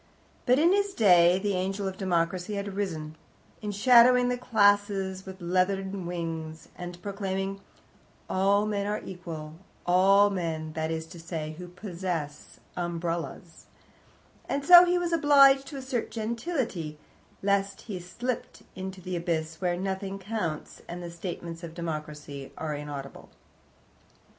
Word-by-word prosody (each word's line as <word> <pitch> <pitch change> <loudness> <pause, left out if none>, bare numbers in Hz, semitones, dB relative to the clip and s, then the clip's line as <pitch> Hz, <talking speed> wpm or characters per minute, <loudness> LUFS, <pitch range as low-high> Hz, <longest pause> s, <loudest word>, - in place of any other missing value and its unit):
But 250 +1 +5
in 335 +5 +5
his 405 0 +1
day 180 -4 +6
the 200 +1 -1
angel 195 +2 -1
of 190 - -4
Democracy 185 +1 -1
had 200 0 -3
arisen, 165 -6 -4 0.5
enshadowing 245 +4 +5
the 250 - +1
classes 205 -4 +2
with 190 0 -8
leathern 190 +1 0
wings, 165 -2 -5
and 175 0 -7
proclaiming, 195 -1 -3 0.7
"All 200 +2 +2
men 205 -1 -1
are 210 +1 -1
equal 165 -4 -7 0.3
all 195 +3 +5
men, 160 -4 -3
that 160 0 -2
is 160 0 -3
to 170 +1 -12
say, 160 -2 -5
who 180 - -7
possess 175 -5 -5 0.2
umbrellas," 170 -1 -4 0.8
and 280 0 -1
so 355 +2 +10
he 355 0 +2
was 350 -1 -1
obliged 275 -3 +6
to 290 - -7
assert 260 -3 -3
gentility, 225 - -3 0.5
lest 200 0 +1
he 200 -5 -6
slipped 235 +8 -5
into 190 0 -6
the 180 +1 -4
abyss 165 -1 -2
where 175 -1 0
nothing 195 +1 -3
counts, 190 -6 -4
and 175 +1 -6
the 170 - -6
statements 170 -1 -6
of 165 -1 -8
Democracy 150 -4 -6
are 155 -1 -3
inaudible. 145 -2 -7
190 Hz, 135 wpm, -28 LUFS, 170-205 Hz, 0.8 s, so